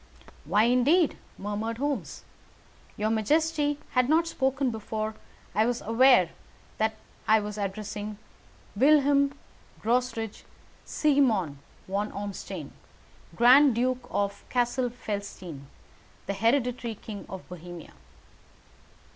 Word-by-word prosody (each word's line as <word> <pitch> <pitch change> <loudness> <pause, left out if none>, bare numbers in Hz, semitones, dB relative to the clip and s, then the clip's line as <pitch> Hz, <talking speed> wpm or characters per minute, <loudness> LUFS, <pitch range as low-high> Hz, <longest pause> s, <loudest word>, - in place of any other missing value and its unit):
"Why, 200 +8 +3
indeed?" 265 +8 +4 0.2
murmured 210 +3 -3
Holmes. 285 +2 -3 0.7
"Your 215 +1 0
majesty 295 +6 +1
had 250 0 +2
not 325 +2 +4
spoken 270 -4 0
before 220 0 -4 0.4
I 215 +2 +3
was 245 -1 0
aware 230 -5 +5 0.5
that 220 0 +1 0.3
I 220 0 +6
was 210 0 -5
addressing 205 +1 -4 0.6
Wilhelm 280 +2 +4 0.5
Gottsreich 230 -2 -1 0.4
Sigismond 230 - +2 0.3
von 200 +2 -2
Ormstein, 195 -6 -6 0.6
Grand 255 - +7
Duke 250 +1 0
of 200 0 -2
Cassel 245 0 +1
Felstein, 200 - -6 0.6
and 200 - -2
hereditary 235 0 +1
King 205 0 -9
of 190 -1 -8
Bohemia." 175 -1 -10
225 Hz, 100 wpm, -27 LUFS, 205-265 Hz, 0.7 s, Grand